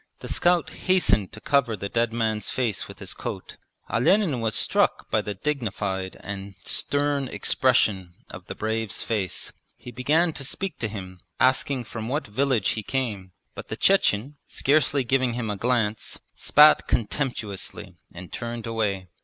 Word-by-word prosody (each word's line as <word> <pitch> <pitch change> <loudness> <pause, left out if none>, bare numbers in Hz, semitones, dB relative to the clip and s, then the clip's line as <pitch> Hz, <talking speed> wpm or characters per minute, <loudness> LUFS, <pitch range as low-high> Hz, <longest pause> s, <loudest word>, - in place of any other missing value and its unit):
The - - -7
scout 175 -1 +2
hastened 110 - +2
to 110 - -9
cover 125 -3 +1
the 100 - -4
dead 115 +2 0
man's 110 -2 -1
face 120 -6 -1
with - - -11
his - - -4
coat. - - -6 0.3
Olenin 145 - +2
was 115 -2 0
struck - - +2
by - - +3
the 105 - -5
dignified 100 -7 -2
and 100 -1 -6
stem 145 -1 0
expression 100 -10 +1
of - - -11
the - - -6
brave's 110 -1 -2
face. 100 -6 -2 0.2
He 125 - -10
began 155 +8 +2
to 135 - -5
speak 190 +6 -3
to 115 - -1
him, 95 -3 -8 0.2
asking 130 0 +2
from 115 -1 -6
what 145 +5 -1
village 120 -1 +1
he 110 - -1
came, 105 -7 -3 0.2
but - - -8
the - - -5
Chechen, 145 - +2
scarcely 140 -1 +2
giving 130 -1 +1
him 115 -3 -2
a - - -2
glance, 110 -1 -1
spat 150 +1 +6
contemptuously 105 - -2
and 90 +1 -10
turned 120 -1 -5
away. 105 -5 -1
115 Hz, 155 wpm, -25 LUFS, 105-135 Hz, 0.3 s, spat